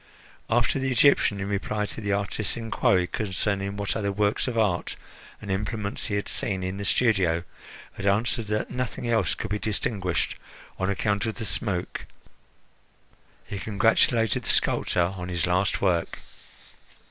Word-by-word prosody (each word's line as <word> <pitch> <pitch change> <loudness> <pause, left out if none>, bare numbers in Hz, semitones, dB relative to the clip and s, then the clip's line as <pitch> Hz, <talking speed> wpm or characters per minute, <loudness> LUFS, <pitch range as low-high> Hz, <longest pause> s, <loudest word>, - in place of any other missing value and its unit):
After 120 +3 +2
the 135 0 -1
Egyptian, 120 -5 +4
in 95 - -3
reply 105 +1 -1
to 110 - -6
the 100 -1 -1
artist's 100 +2 -1
inquiry 100 -5 +2
concerning 100 +1 -2
what 100 -1 -2
other 100 -2 -1
works 105 +4 +1
of 120 -2 -2
art 105 -6 +1 0.4
and 100 -2 -5
implements 100 +1 -2
he 100 - -1
had 100 - -2
seen 95 -2 -1
in 95 +1 -3
the 100 - -4
studio, 95 -9 +2 0.5
had 100 - -4
answered 110 +3 +2
that 105 +1 -1
nothing 125 0 -3
else 115 -1 +2
could 110 - -5
be 105 - 0
distinguished 100 -4 -1 0.4
on 95 0 0
account 100 +1 0
of 110 - -3
the 115 - -4
smoke, 95 -4 +1 1.4
he 100 - -5
congratulated 110 +1 +2
the - - -5
sculptor 85 +1 +2
on 90 -1 -6
his 85 -2 0
last 90 +2 +1
work. 90 -3 +1
100 Hz, 155 wpm, -26 LUFS, 95-110 Hz, 1.4 s, Egyptian